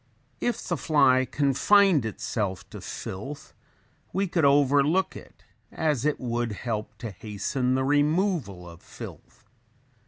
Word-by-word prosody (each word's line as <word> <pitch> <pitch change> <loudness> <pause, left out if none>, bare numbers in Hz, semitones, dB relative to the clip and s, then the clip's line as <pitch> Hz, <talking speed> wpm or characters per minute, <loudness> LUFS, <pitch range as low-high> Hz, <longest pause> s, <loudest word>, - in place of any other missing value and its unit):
If 240 - -2
the 175 - -1
fly 130 -4 +3
confined 150 - +4
itself 100 -3 -3
to - - -8
filth 135 +10 -7 0.6
we 195 +1 0
could 165 -3 +1
overlook 145 +5 +3
it - - -13 0.3
as 150 -5 0
it 150 - +1
would 120 -2 -2
help 110 0 -4
to 115 -3 -6
hasten 110 +6 -2
the 130 - +1
removal 145 - +1
of 85 -1 -12
filth. - - -12
135 Hz, 125 wpm, -26 LUFS, 115-155 Hz, 0.6 s, confined